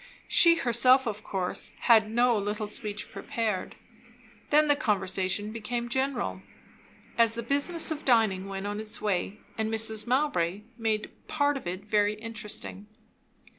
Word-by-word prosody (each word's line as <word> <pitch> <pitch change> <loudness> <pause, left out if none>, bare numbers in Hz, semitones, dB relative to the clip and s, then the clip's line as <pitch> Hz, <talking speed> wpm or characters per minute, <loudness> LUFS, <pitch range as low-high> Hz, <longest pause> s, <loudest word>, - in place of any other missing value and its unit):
She 335 -1 +6
herself, 255 -1 +4
of 215 -2 -4
course, 185 -2 -3
had 220 -3 +5
no 240 +1 +3
little 210 +1 -2
speech 210 0 -5
prepared. 225 -8 -3 0.7
Then 300 +1 +5
the 290 - +4
conversation 200 -3 -1
became 235 +2 -4
general, 265 0 -1 0.8
as 230 -1 +4
the 235 - -4
business 285 +7 +1
of 310 -1 -4
dining 215 -6 +2
went 195 0 -5
on 205 +1 -3
its 215 -1 -3
way, 200 0 -1 0.2
and 220 0 0
Mrs. 220 -1 0
Mowbray 225 - +1
made 220 -2 -2 0.2
part 290 -1 +1
of 270 - -6
it 185 +3 -4
very 210 0 +2
interesting. 215 -2 -6
220 Hz, 140 wpm, -28 LUFS, 205-245 Hz, 0.8 s, She